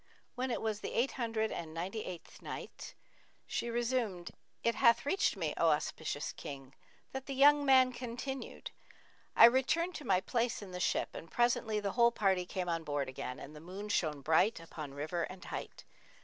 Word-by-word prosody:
When 260 +1 -2
it 240 - -2
was 215 -2 -1
the - - -5
Eight 245 +4 +2
Hundred 225 -3 -1
and 160 -1 -5
Ninety 190 +6 -3
eighth 175 -2 -9
Night, - - -7 0.5
She 235 - -2
resumed, 235 -7 -1 0.3
It 235 - +3
hath 235 +2 +4
reached 335 - +1
me, 160 -5 -1
O 165 - +4
auspicious 150 -1 -1
King, 135 -1 -8 0.4
that 265 0 -6
the 275 - -3
young 290 +2 +6
man 260 -2 +5
continued, 250 +2 -6 0.6
"I - - +10
returned 265 +9 +3
to 300 - -9
my 190 -7 +3
place 230 +2 -1
in 190 - -9
the 180 - -5
ship; - - +1
and 165 - -8
presently 235 -1 +1
the 200 -1 -2
whole 235 +1 +5
party 190 -5 +1
came 185 -1 -3
on 165 -1 -1
board 145 -3 -2
again 130 -1 -5
and 150 +2 -10
the - - -9
moon 190 +6 -7
shone 155 -7 0
bright 165 +8 +3
upon 155 -4 -8
river 155 +4 -2
and 185 +2 -6
height. - - -7
210 Hz, 185 wpm, -33 LUFS, 165-240 Hz, 0.6 s, I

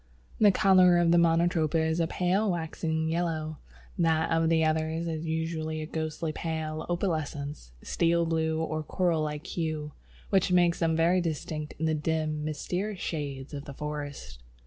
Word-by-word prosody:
The 210 -2 +7
colour 185 -3 +5
of 175 -1 +3
Monotropa 170 -1 +3
is 160 +1 +1
a 165 - +2
pale 185 +5 +1
waxen 160 -2 -2
yellow, 160 -2 -2 0.4
that 160 -1 +2
of 165 0 +2
the 160 -1 +3
others 160 +1 0
is 160 0 -3
usually 160 -1 -2
a 155 - -4
ghostly 160 0 -3
pale, 160 -1 -4
opalescent, 155 - -2
steel 170 0 +2
blue 160 -1 0
or 155 -1 -2
coral 170 0 0
like 150 -1 -3
hue, 155 -3 -3 0.4
which 190 -2 +3
makes 175 -1 +3
them 165 -1 +2
very 170 +3 +3
distinct 155 -2 -4
in 160 - -1
the 160 - +2
dim, 155 0 -1
mysterious 180 +6 -3
shades 140 -4 -4
of 140 0 -6
the 140 - -9
forest. 145 - -6
160 Hz, 155 wpm, -28 LUFS, 155-170 Hz, 0.4 s, The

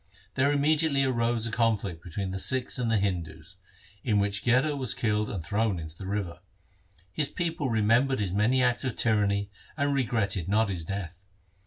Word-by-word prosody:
There 140 +2 +2
immediately 145 0 +2
arose 120 -3 +1
a 115 - -2
conflict 105 -7 0
between 95 +2 -4
the 95 - -4
Sikhs 130 +3 -2
and 120 -2 0
the 115 - +3
Hindus, 90 -5 -3 0.5
in 105 -4 +2
which 100 0 +1
Gherar 130 +5 +3
was 130 -4 -1
killed 105 -3 0
and 95 -5 -4
thrown 105 +3 0
into 80 -1 -8
the 95 +2 -8
river. 100 -4 -3 0.7
His 150 - 0
people 165 -5 -2
remembered 115 +4 +3
his 95 -4 -1
many 120 +6 +3
acts 125 +1 +1
of 130 -3 -2
tyranny 100 -3 +1 0.3
and 145 -1 +1
regretted 110 -9 0
not 110 +1 +3
his 90 -4 -3
death. 90 -2 -5
110 Hz, 175 wpm, -28 LUFS, 100-130 Hz, 0.7 s, the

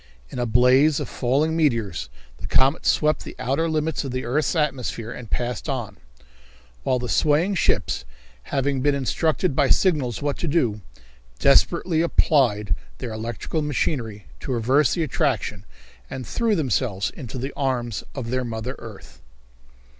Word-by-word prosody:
In - - -5
a 120 - 0
blaze 130 +6 +5
of - - -3
falling 140 +6 +1
meteors 115 - 0 0.3
the - - -6
comet 135 +5 +2
swept 155 0 +2
the - - -9
outer 150 +6 0
limits 155 -1 -1
of 135 - -4
the 130 0 -3
earth's 150 +8 0
atmosphere 125 -7 -1
and 120 -4 -8
passed 125 +4 -2
on, 120 -7 -3 0.8
while 125 - +1
the 125 0 -4
swaying 155 +9 +2
ships, 110 - +1 0.4
having 135 -1 0
been 145 +1 +2
instructed 155 +3 0
by - - +3
signals 140 - +2
what 145 -1 -2
to 170 - -2
do, 120 -10 +1 0.6
desperately 160 - +3
applied 120 - +2 0.2
their 115 - -5
electrical 115 +8 -3
machinery 120 - -2
to 135 - -5
reverse 130 +4 +3
the 170 - 0
attraction 120 - -1 0.4
and 130 -2 -6
threw 230 - +1
themselves 125 - 0
into 130 -4 -8
the 135 +3 -4
arms 120 -5 -1
of 120 -4 -4
their 130 0 0
mother 115 +2 -4
earth. 110 -4 -11
130 Hz, 150 wpm, -23 LUFS, 115-150 Hz, 0.8 s, blaze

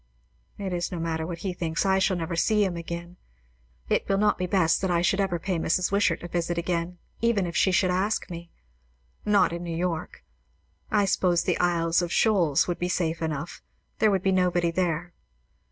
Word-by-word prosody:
It 195 -2 -4
is 175 -1 -2
no 175 - -4
matter 160 -1 -2
what 170 -1 -5
he 185 - -1
thinks; 165 0 -2
I 190 0 +3
shall 190 -1 +2
never 170 0 -3
see 210 +4 +2
him 185 -2 -2
again; 170 +1 -6 0.7
it - - 0
will 195 - +2
not 210 -1 +2
be 180 - -1
best 175 -4 +2
that 190 - 0
I 175 -1 +2
should 195 +3 +2
ever 190 -3 +1
pay 180 0 -2
Mrs. 175 +3 +1
Wishart 200 -5 +1
a - - -4
visit 175 0 -2
again, 170 0 -2 0.2
even 230 -5 +2
if 170 - -5
she 190 - +3
should 185 0 +2
ask 195 +4 0
me; 170 -1 -8 0.8
not 200 -4 +3
in 170 - -4
New 165 -1 -4
York. 170 -2 -3 0.7
I 205 -2 +3
suppose 180 -2 +2
the - - 0
Isles 170 -1 +2
of 175 -1 -3
Shoals 175 -11 +3
would 175 - -2
be 180 - -1
safe 165 -2 -1
enough. 160 0 -4 0.4
There 220 - +4
would 190 -2 +1
be 195 - +2
nobody 180 -2 +2
there. 175 0 -1
175 Hz, 200 wpm, -26 LUFS, 170-190 Hz, 0.8 s, There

